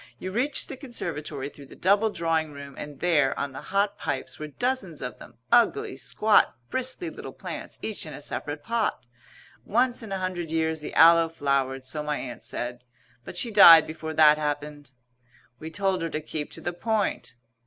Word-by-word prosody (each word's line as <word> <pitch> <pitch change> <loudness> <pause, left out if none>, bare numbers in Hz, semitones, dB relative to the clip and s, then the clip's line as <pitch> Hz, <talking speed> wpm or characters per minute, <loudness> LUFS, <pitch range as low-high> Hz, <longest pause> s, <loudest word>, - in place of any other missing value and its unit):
You 185 - -6
reached 265 +7 +1
the - - -7
conservatory 155 - -5
through 140 -1 -14
the - - -13
double 200 +4 +3
drawing 165 -4 -1
room, 140 0 -9
and 145 -2 -8
there, 150 -6 +2
on 140 - -2
the 135 - -8
hot 200 +1 0
pipes, - - -4
were 155 - -5
dozens 195 - -2
of 125 -1 -6
them, 120 - -14
ugly, 420 - +3
squat, 215 -9 +2 0.2
bristly 260 +7 -2
little - - -8
plants - - -7
each 215 -6 -3
in 155 - -8
a - - -8
separate 145 0 -5
pot. 225 - -1 0.6
Once 245 - +1
in 220 -3 -9
a 195 - -1
hundred 185 -3 -3
years 160 -1 0
the 150 - -6
Aloe 165 0 +7
flowered, 135 -4 -1
so 150 +3 -3
my 150 0 -2
Aunt 125 -2 -7
said. 120 0 -4 0.4
But - - -7
she 235 - -1
died 165 -6 +9
before 160 0 -6
that 150 -1 +6
happened 145 -1 -4 0.4
" 120 0 -32
We 160 - -7
told 190 0 0
her 165 - -2
to 155 - -3
keep 155 -1 -5
to - - -3
the 175 - -3
point. 195 - -1
160 Hz, 190 wpm, -26 LUFS, 145-205 Hz, 0.6 s, died